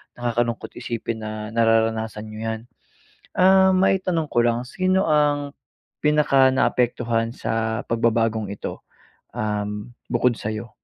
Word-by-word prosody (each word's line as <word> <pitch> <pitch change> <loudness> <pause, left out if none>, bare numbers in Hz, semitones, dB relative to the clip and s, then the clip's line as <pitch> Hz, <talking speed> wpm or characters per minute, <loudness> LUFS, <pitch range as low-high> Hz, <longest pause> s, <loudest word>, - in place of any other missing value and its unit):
nakakalungkot 120 -1 -2
isipin 115 -1 -4
na 110 0 -6
nararanasan 110 -1 +1
niyo 110 - -8
'yan. 110 0 -2 0.8
Ah, 190 0 +5
maitanong 185 -4 +1
ko - - 0
lang, 120 +1 +1
sino 185 +6 0
ang 145 -1 +2 0.5
pinakanaapektuhan 130 -5 +2
sa 110 +1 -2
pagbabagong 115 -3 +1
ito, - - -7 0.5
um, 105 0 -3 0.2
bukod 120 0 +2
sa'yo? 110 +2 -5
115 Hz, 105 wpm, -23 LUFS, 110-145 Hz, 0.8 s, Ah